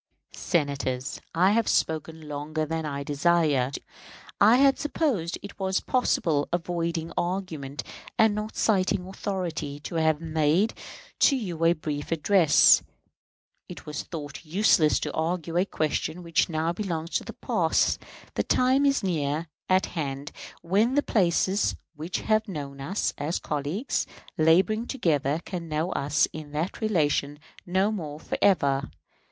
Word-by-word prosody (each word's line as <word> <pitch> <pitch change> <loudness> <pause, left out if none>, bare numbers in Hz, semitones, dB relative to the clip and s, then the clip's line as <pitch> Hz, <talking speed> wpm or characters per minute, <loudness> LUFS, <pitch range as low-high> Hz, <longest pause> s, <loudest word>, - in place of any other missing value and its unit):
Senators, 140 -6 -2
I 185 +4 +4
have 225 +1 +2
spoken 160 0 -1
longer 150 +2 -3
than 160 0 -3
I 140 -1 -4
desired. 145 -3 +2 0.6
I 225 - +7
had 275 +1 +4
supposed 275 - -1
it 200 - -10
was 190 0 +1
possible, 165 - +1
avoiding 170 -1 -2
argument 170 -6 -3 0.3
and 220 -1 +5
not 210 +1 -4
citing 190 -3 +1
authority, 180 -7 -4
to 165 - -5
have 160 -1 +2
made 160 +5 +1 0.5
to 280 - +5
you 180 -10 -3
a 170 - +6
brief 150 -2 -5
address. 165 0 +5 0.9
It - - -9
was 150 -1 -4
thought 150 -3 -7
useless 165 -2 +3
to - - -3
argue 165 0 -2
a 180 +2 +3
question 155 +2 -2
which 170 +1 +1
now 160 +1 0
belongs 170 -4 -4
to - - 0
the - - -8
past. - - +1 0.3
The - - 0
time 265 +3 +3
is 275 -4 +1
near 155 -3 -1 0.2
at 185 +1 +4
hand 140 -3 -4 0.3
when 210 +9 +2
the 290 - +3
places 190 0 +2 0.2
which 160 +5 -4
have 215 0 +1
known 140 -6 -6
us 185 +9 -1
as 150 +4 -1
colleagues 150 - -2 0.3
laboring 185 +9 +3
together 155 - 0
can 170 -4 -5
know 155 +4 -1
us 140 +1 +2
in 150 -1 -8
that 160 +9 -3
relation 150 -8 +1 0.3
no 190 +4 +2
more 155 -8 -5
for - - -4
ever. 140 -8 +3
165 Hz, 140 wpm, -26 LUFS, 150-190 Hz, 0.9 s, I